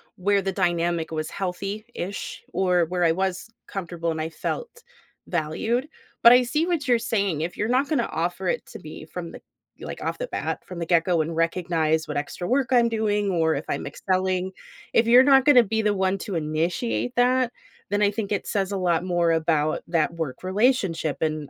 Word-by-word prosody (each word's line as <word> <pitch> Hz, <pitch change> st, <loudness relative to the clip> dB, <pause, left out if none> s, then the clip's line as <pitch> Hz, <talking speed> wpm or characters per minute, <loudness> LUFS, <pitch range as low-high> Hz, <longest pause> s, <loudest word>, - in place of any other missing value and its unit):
where 200 Hz, +2 st, +2 dB
the 195 Hz, 0 st, -2 dB
dynamic 175 Hz, -3 st, 0 dB
was 155 Hz, -1 st, -3 dB
healthy-ish, 200 Hz, +2 st, -5 dB
or 180 Hz, -3 st, +2 dB
where 180 Hz, +1 st, -1 dB
I 165 Hz, -, +4 dB
was 190 Hz, +2 st, -2 dB, 0.2 s
comfortable 170 Hz, -3 st, -3 dB
and 160 Hz, -, -3 dB
I 160 Hz, -, -3 dB
felt 475 Hz, -, -5 dB, 0.4 s
valued, 205 Hz, -, -1 dB, 0.4 s
but 235 Hz, -, +10 dB
I 250 Hz, +1 st, +7 dB
see 300 Hz, +7 st, 0 dB
what 335 Hz, -7 st, -1 dB
you're 240 Hz, -2 st, +4 dB
saying, 200 Hz, -9 st, -1 dB
if 170 Hz, +2 st, -4 dB
you're 210 Hz, -, 0 dB
not 260 Hz, +3 st, +2 dB
gonna 275 Hz, -7 st, 0 dB
offer 175 Hz, +2 st, -2 dB
it 485 Hz, -, -1 dB
to -, -, -10 dB
me -, -, -10 dB
from -, -, -7 dB
the -, -, -11 dB, 0.4 s
y -, -, -8 dB
like, -, -, -7 dB
off -, -, -2 dB
the -, -, -4 dB
bat, -, -, -3 dB
from 180 Hz, -2 st, -8 dB
the 170 Hz, -, -2 dB
get 170 Hz, -2 st, +4 dB
go 175 Hz, -2 st, +2 dB
and 160 Hz, +1 st, -3 dB
recognize 165 Hz, -2 st, 0 dB
what 150 Hz, -, -3 dB
extra 150 Hz, +4 st, -4 dB
work 260 Hz, +2 st, +1 dB
I'm 240 Hz, -2 st, +4 dB
doing, 210 Hz, -2 st, 0 dB
or 160 Hz, -3 st, +2 dB
if 140 Hz, -, -4 dB
I'm -, -, -2 dB
excelling; 185 Hz, 0 st, -1 dB, 0.4 s
if 230 Hz, -, +4 dB
you're 245 Hz, +2 st, +8 dB
not 270 Hz, -1 st, +5 dB
gonna 270 Hz, -5 st, +7 dB
be 220 Hz, +1 st, -1 dB
the 210 Hz, -1 st, +2 dB
one 190 Hz, 0 st, +1 dB
to 195 Hz, -2 st, -5 dB
initiate 165 Hz, +10 st, -1 dB
that, 250 Hz, 0 st, +3 dB, 0.4 s
then 205 Hz, +1 st, 0 dB
I 205 Hz, -, +5 dB
think 205 Hz, -1 st, -4 dB
it 205 Hz, -, -1 dB
says 195 Hz, -1 st, -1 dB
a 200 Hz, -, -1 dB
lot 175 Hz, -2 st, +1 dB
more 175 Hz, -2 st, +1 dB
about 160 Hz, -2 st, +1 dB
that 165 Hz, -1 st, +1 dB
work 160 Hz, -4 st, -5 dB
relationship 190 Hz, -, +1 dB
and 155 Hz, -2 st, -2 dB
185 Hz, 205 wpm, -24 LUFS, 165-230 Hz, 0.4 s, but